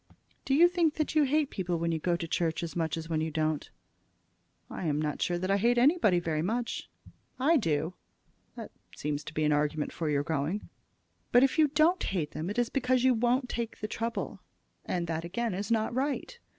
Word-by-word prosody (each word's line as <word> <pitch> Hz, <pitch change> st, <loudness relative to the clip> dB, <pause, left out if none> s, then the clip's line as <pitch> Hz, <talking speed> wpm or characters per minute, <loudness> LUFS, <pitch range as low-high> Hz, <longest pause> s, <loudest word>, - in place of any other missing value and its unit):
"Do 270 Hz, -, +2 dB
you 340 Hz, +4 st, +7 dB
think 335 Hz, -3 st, +1 dB
that 310 Hz, -, -1 dB
you 305 Hz, -2 st, +4 dB
hate 295 Hz, +1 st, +1 dB
people 180 Hz, -3 st, -2 dB
when 170 Hz, 0 st, -1 dB
you 160 Hz, -, -1 dB
go 175 Hz, +2 st, +1 dB
to 170 Hz, -1 st, -4 dB
church 165 Hz, 0 st, -1 dB
as 170 Hz, -, -5 dB
much 165 Hz, -2 st, -1 dB
as 165 Hz, 0 st, -5 dB
when 160 Hz, -2 st, -1 dB
you 160 Hz, -, -1 dB
don't?" 155 Hz, -1 st, -1 dB, 1.0 s
"I 175 Hz, -, -5 dB
am 150 Hz, -1 st, +1 dB
not 150 Hz, -1 st, -2 dB
sure 175 Hz, -, +1 dB
that 185 Hz, +2 st, -1 dB
I 200 Hz, -, +4 dB
hate 240 Hz, +4 st, +2 dB
anybody 250 Hz, -, +4 dB
very 160 Hz, -3 st, -1 dB
much." 230 Hz, +7 st, -2 dB, 0.5 s
"I 300 Hz, +6 st, +4 dB
do." 160 Hz, -, 0 dB, 0.6 s
"That -, -, -8 dB, 0.2 s
seems 150 Hz, 0 st, -3 dB
an 155 Hz, -1 st, +2 dB
argument 150 Hz, +1 st, 0 dB
for 160 Hz, -2 st, -2 dB
your 145 Hz, -1 st, +1 dB
going." 160 Hz, +6 st, -2 dB, 0.6 s
"But 245 Hz, +1 st, +6 dB
if 270 Hz, +4 st, +2 dB
you 310 Hz, -, +6 dB
don't 310 Hz, +5 st, +3 dB
hate 165 Hz, -6 st, -2 dB
them 160 Hz, +4 st, -4 dB
it 205 Hz, -, -4 dB
is 240 Hz, -1 st, +1 dB
because 255 Hz, -2 st, +1 dB
you 260 Hz, 0 st, +5 dB
won't 245 Hz, +3 st, +1 dB
take 235 Hz, -2 st, -4 dB
the 215 Hz, -, -4 dB
trouble, 230 Hz, +2 st, -3 dB, 0.5 s
and 175 Hz, -2 st, -1 dB
that 165 Hz, -1 st, -3 dB
again 215 Hz, +6 st, -2 dB
is 200 Hz, +2 st, -4 dB
not 225 Hz, 0 st, +1 dB
right. 280 Hz, -, -2 dB
190 Hz, 205 wpm, -29 LUFS, 160-255 Hz, 1.0 s, you